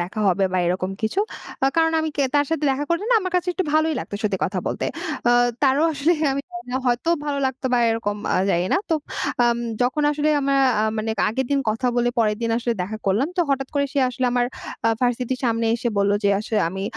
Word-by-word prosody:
দেখা 185 Hz, +5 st, -4 dB
হবে 195 Hz, +1 st, +2 dB
বা 185 Hz, -, +1 dB
এরকম 185 Hz, +1 st, -1 dB
কিছু। 220 Hz, -, 0 dB, 0.4 s
আ -, -, +5 dB
কারণ 325 Hz, 0 st, +3 dB
আমি 315 Hz, -, -1 dB
কে 285 Hz, -, +2 dB
তার 290 Hz, 0 st, +4 dB
সাথে 325 Hz, -2 st, -1 dB
দেখা 270 Hz, +2 st, -1 dB
করলে 340 Hz, +5 st, 0 dB
না -, -, +5 dB
আমার 370 Hz, -1 st, -4 dB
কাছে 360 Hz, 0 st, -1 dB
একটু 375 Hz, -, -2 dB
ভালোই 315 Hz, 0 st, +2 dB
লাগতো -, -, -7 dB
সত্যি 200 Hz, -3 st, 0 dB
কথা 190 Hz, 0 st, -2 dB
বলতে। -, -, -2 dB, 0.4 s
অ -, -, +5 dB, 0.3 s
তারও 280 Hz, +2 st, +4 dB
আসলে 300 Hz, +3 st, +2 dB, 0.2 s
আমি 275 Hz, -, -1 dB
জানিনা 355 Hz, -8 st, -5 dB
হয়তো 245 Hz, +6 st, 0 dB, 0.2 s
ভালো 285 Hz, -1 st, -1 dB
লাগতো 260 Hz, 0 st, -3 dB
বা 245 Hz, -, +4 dB
এরকম 215 Hz, -2 st, -1 dB, 0.2 s
আ -, -, +3 dB
জানি 175 Hz, 0 st, +1 dB
না। -, -, +4 dB
তো -, -, +4 dB, 0.5 s
আম 235 Hz, 0 st, +2 dB, 0.2 s
যখন 255 Hz, +5 st, +1 dB
আসলে 300 Hz, +1 st, 0 dB
আমরা 275 Hz, 0 st, +1 dB, 0.2 s
আ -, -, +2 dB, 0.2 s
মানে 220 Hz, +1 st, -2 dB, 0.2 s
আগের 260 Hz, +4 st, -2 dB
দিন 280 Hz, -1 st, +2 dB
কথা 225 Hz, +4 st, -2 dB
বলে, 240 Hz, 0 st, +2 dB
পরের 210 Hz, -2 st, +2 dB
দিন 230 Hz, -, 0 dB
আসলে 240 Hz, 0 st, -1 dB
দেখা 205 Hz, +4 st, -4 dB
করলাম। 210 Hz, +9 st, +2 dB
তো -, -, +3 dB
হঠাৎ 270 Hz, -1 st, 0 dB
করে 285 Hz, 0 st, +2 dB
সে 285 Hz, -, -1 dB
আসলে 255 Hz, +1 st, -3 dB
আমার 245 Hz, 0 st, +2 dB, 0.4 s
আ -, -, +5 dB
ভার্সিটির 250 Hz, +1 st, 0 dB
সামনে 230 Hz, -1 st, +1 dB
এসে 240 Hz, +1 st, -1 dB
বললো 200 Hz, 0 st, +3 dB
যে, -, -, +4 dB
"আসলে 215 Hz, 0 st, -1 dB
আমি 190 Hz, +2 st, -5 dB
250 Hz, 230 wpm, -22 LUFS, 215-290 Hz, 0.5 s, আ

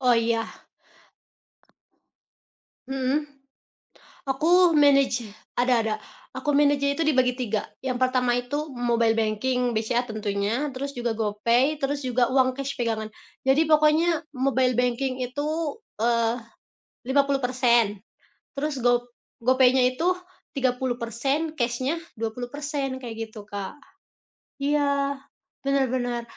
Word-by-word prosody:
Oh 250 Hz, -2 st, +4 dB
iya. 230 Hz, 0 st, +1 dB, 2.5 s
Mhm, 270 Hz, +3 st, -1 dB, 0.9 s
aku 335 Hz, +6 st, +4 dB
manage 275 Hz, -5 st, +4 dB, 0.3 s
ada 250 Hz, +1 st, +3 dB
ada 220 Hz, -1 st, -1 dB, 0.4 s
aku 265 Hz, +3 st, -2 dB
manage-nya 285 Hz, -1 st, +3 dB
itu 330 Hz, -, -1 dB
dibagi 255 Hz, -5 st, +3 dB
3, 225 Hz, -4 st, -2 dB, 0.2 s
yang 255 Hz, -2 st, -2 dB
pertama 255 Hz, -1 st, +2 dB
itu 290 Hz, +5 st, -3 dB
mobile 235 Hz, -3 st, +1 dB
banking 240 Hz, +3 st, 0 dB
BCA 235 Hz, +3 st, 0 dB
tentunya 215 Hz, +5 st, -2 dB
terus 280 Hz, +2 st, -5 dB
juga 240 Hz, -1 st, -2 dB
GoPay 230 Hz, +6 st, +1 dB
terus 280 Hz, 0 st, -1 dB
juga 250 Hz, 0 st, +2 dB
uang 260 Hz, -1 st, +3 dB
cash 275 Hz, +1 st, -5 dB
pegangan. 220 Hz, -2 st, -2 dB, 0.3 s
Jadi 270 Hz, +4 st, +3 dB
pokoknya 310 Hz, +2 st, +3 dB, 0.2 s
mobile 260 Hz, -2 st, +2 dB
banking 250 Hz, +1 st, 0 dB
itu, 285 Hz, +4 st, -4 dB, 0.5 s
eee, 230 Hz, +1 st, +1 dB, 0.7 s
50%, 255 Hz, -6 st, +2 dB, 0.6 s
terus 285 Hz, -1 st, -2 dB
go 245 Hz, 0 st, +3 dB, 0.4 s
GoPaynya 255 Hz, +1 st, +4 dB
itu 320 Hz, +7 st, -1 dB, 0.5 s
30% 255 Hz, +3 st, -1 dB
cashnya 255 Hz, +6 st, 0 dB, 0.2 s
20% 260 Hz, +5 st, -4 dB
kayak 235 Hz, -2 st, -6 dB
gitu 220 Hz, -1 st, -10 dB
Kak, 200 Hz, -2 st, -6 dB, 0.8 s
iya 280 Hz, -1 st, 0 dB, 0.4 s
benar 275 Hz, -1 st, +2 dB
benar. 245 Hz, -2 st, -1 dB
255 Hz, 105 wpm, -25 LUFS, 235-280 Hz, 2.5 s, Oh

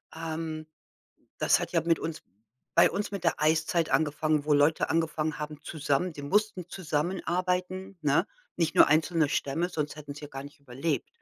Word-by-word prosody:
ähm, 160 Hz, -1 st, -4 dB, 0.7 s
das -, -, +3 dB
hat -, -, -5 dB
ja 165 Hz, -, +3 dB
mit 165 Hz, 0 st, +2 dB
uns 160 Hz, -1 st, -5 dB, 0.5 s
bei -, -, +6 dB
uns 205 Hz, 0 st, -3 dB
mit 200 Hz, -3 st, -5 dB
der 165 Hz, -, +1 dB
Eiszeit 160 Hz, +2 st, +2 dB
angefangen, 155 Hz, -1 st, +1 dB
wo 150 Hz, -, +3 dB
Leute 145 Hz, +2 st, +3 dB
angefangen 160 Hz, -1 st, 0 dB
haben 150 Hz, 0 st, -6 dB
zusammen 155 Hz, +3 st, -1 dB
die 145 Hz, -2 st, -9 dB
mussten 190 Hz, +2 st, 0 dB
zusammenarbeiten, 180 Hz, +3 st, -2 dB
ne? 150 Hz, +4 st, +3 dB, 0.3 s
Nicht 165 Hz, -2 st, 0 dB
nur -, -, +7 dB
einzelne 155 Hz, 0 st, +3 dB
Stämme, 165 Hz, +7 st, 0 dB
sonst 150 Hz, -4 st, -3 dB
hätten 145 Hz, -2 st, -8 dB
sie 150 Hz, -1 st, -8 dB
gar 135 Hz, -1 st, -7 dB
nicht 145 Hz, +1 st, -12 dB
überlebt, 140 Hz, +3 st, -2 dB
160 Hz, 165 wpm, -28 LUFS, 150-175 Hz, 0.7 s, nur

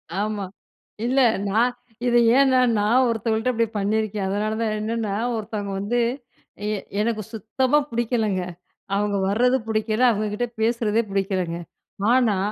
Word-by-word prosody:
ஆமா. 205 Hz, 0 st, -2 dB, 0.6 s
இல்ல, 260 Hz, +3 st, +2 dB, 0.3 s
நான் 235 Hz, +5 st, +2 dB, 0.3 s
இது 240 Hz, 0 st, +4 dB, 0.2 s
ஏனா 265 Hz, -2 st, +5 dB, 0.2 s
நான் 235 Hz, +5 st, +3 dB
ஒருத்தவுகள்ட்ட 225 Hz, +2 st, 0 dB
இப்பிடி 230 Hz, 0 st, +1 dB
பண்ணியிருக்கேன். 210 Hz, 0 st, -1 dB
அதனால 210 Hz, +2 st, -1 dB
தான் 220 Hz, -1 st, 0 dB
என்னன்னா, 215 Hz, -2 st, -2 dB, 0.2 s
ஒருத்தவங்க 210 Hz, -2 st, -4 dB
வந்து 230 Hz, +5 st, 0 dB, 0.7 s
எ 215 Hz, -1 st, 0 dB, 0.2 s
எனக்கு 220 Hz, -1 st, -1 dB
சுத்தமா 255 Hz, +6 st, +1 dB
புடிக்கலங்க. 225 Hz, -5 st, 0 dB, 0.5 s
அவுங்க 205 Hz, 0 st, 0 dB
வர்றது 250 Hz, +5 st, +3 dB
புடிக்கல, 220 Hz, +1 st, 0 dB
அவங்கக்கிட்ட 215 Hz, +2 st, -2 dB
பேசுறதே 225 Hz, -1 st, +2 dB
புடிக்கலங்க. 190 Hz, -3 st, -1 dB, 0.6 s
ஆனா, 235 Hz, -6 st, +3 dB
220 Hz, 120 wpm, -23 LUFS, 205-235 Hz, 0.7 s, ஏனா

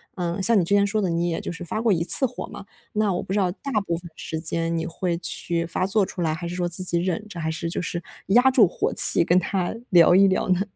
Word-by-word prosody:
嗯， 175 Hz, 0 st, -3 dB
像 225 Hz, +1 st, +4 dB
你 -, -, +2 dB
之 200 Hz, -, -1 dB
前 200 Hz, 0 st, +4 dB
说 215 Hz, +1 st, -1 dB
的 185 Hz, -, 0 dB
你 170 Hz, +1 st, 0 dB
也 165 Hz, -, -2 dB
就 -, -, -5 dB
是 175 Hz, +1 st, -8 dB
发 195 Hz, +6 st, -4 dB
过 225 Hz, -4 st, +3 dB
一 165 Hz, -1 st, 0 dB
次 265 Hz, -, +4 dB
火 250 Hz, -, -6 dB
嘛， 200 Hz, -1 st, -10 dB, 0.3 s
那 210 Hz, -3 st, +1 dB
我 175 Hz, -, -2 dB
不 -, -, -9 dB
知 -, -, 0 dB
道 180 Hz, -2 st, +1 dB
大 275 Hz, +8 st, -7 dB
部 170 Hz, -, -1 dB
分 175 Hz, -1 st, -11 dB
时 160 Hz, -, -5 dB
间 165 Hz, +1 st, -2 dB
你 165 Hz, -, -2 dB
会 170 Hz, +1 st, -2 dB
去 170 Hz, 0 st, -2 dB
发 185 Hz, +2 st, -2 dB
作 200 Hz, +1 st, +2 dB
出 180 Hz, -, -7 dB
来， 155 Hz, -1 st, 0 dB
还 170 Hz, +1 st, -5 dB
是 175 Hz, -, -5 dB
说 175 Hz, -1 st, -1 dB
自 180 Hz, +2 st, -1 dB
己 175 Hz, -1 st, 0 dB
忍 185 Hz, +4 st, -2 dB
着， 175 Hz, -5 st, -8 dB
还 160 Hz, 0 st, -2 dB
是 165 Hz, +1 st, -4 dB
就 -, -, -3 dB
是 170 Hz, +1 st, -4 dB, 0.3 s
压 245 Hz, +6 st, +5 dB
住 235 Hz, -7 st, +5 dB
火 -, -, -2 dB
气 -, -, +5 dB
跟 175 Hz, +2 st, +3 dB
他 185 Hz, +2 st, -1 dB
聊 175 Hz, 0 st, +6 dB
一 195 Hz, +1 st, +6 dB
聊 190 Hz, 0 st, 0 dB
呢？ 185 Hz, +1 st, +2 dB
180 Hz, 305 characters per minute, -23 LUFS, 170-195 Hz, 0.3 s, 聊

